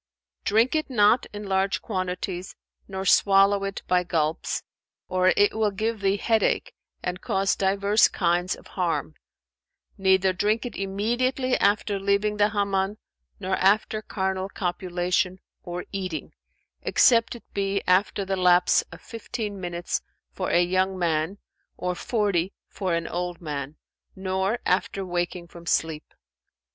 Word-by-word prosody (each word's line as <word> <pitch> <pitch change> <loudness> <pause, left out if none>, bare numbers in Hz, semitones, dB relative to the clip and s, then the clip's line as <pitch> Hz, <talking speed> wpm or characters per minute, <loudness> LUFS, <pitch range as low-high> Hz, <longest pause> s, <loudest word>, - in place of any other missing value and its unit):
"Drink 225 +4 +3
it 310 -2 0
not 230 0 +4
in 205 0 -7
large 195 0 +1
quantities 185 -2 -4 0.3
nor 190 -1 -5
swallow 195 +1 +5
it 195 0 -4
by 180 0 +2
gulps, 160 -2 -1 0.4
or 185 0 +3
it 205 - +4
will 220 -1 +1
give 220 +3 -2
thee 195 0 +2
head 225 +1 +2
ache - - 0 0.3
and 180 0 -3
cause 195 0 +1
divers 200 +2 +3
kinds 175 0 0
of - - -17
harm; - - -2 0.9
neither 190 0 +3
drink 210 +6 0
it 245 - -6
immediately 240 +7 0
after 205 0 +2
leaving 200 +2 +1
the 205 0 +4
Hammam 200 -1 0 0.4
nor 190 +1 -1
after 215 +2 +2
carnal 190 -2 -2
copulation 180 0 -1 0.2
or 175 0 -6
eating 185 -5 -4 0.5
(except 230 -1 +4
it 235 - -11
be 195 0 -1
after 195 +2 +2
the 195 0 -1
lapse 180 -1 +4
of - - -11
fifteen 220 -3 -5
minutes 175 0 -3 0.3
for - - -3
a 175 - +4
young 185 +1 +1
man 165 +1 0 0.4
and 180 0 -2
forty 200 -6 0
for 185 -4 -2
an 170 0 -2
old 175 0 -3
man), 145 -3 -5 0.4
nor 190 +3 -1
after 190 +1 0
waking 175 0 -2
from 170 0 -13
sleep." 160 -2 -1
190 Hz, 140 wpm, -25 LUFS, 180-205 Hz, 0.9 s, swallow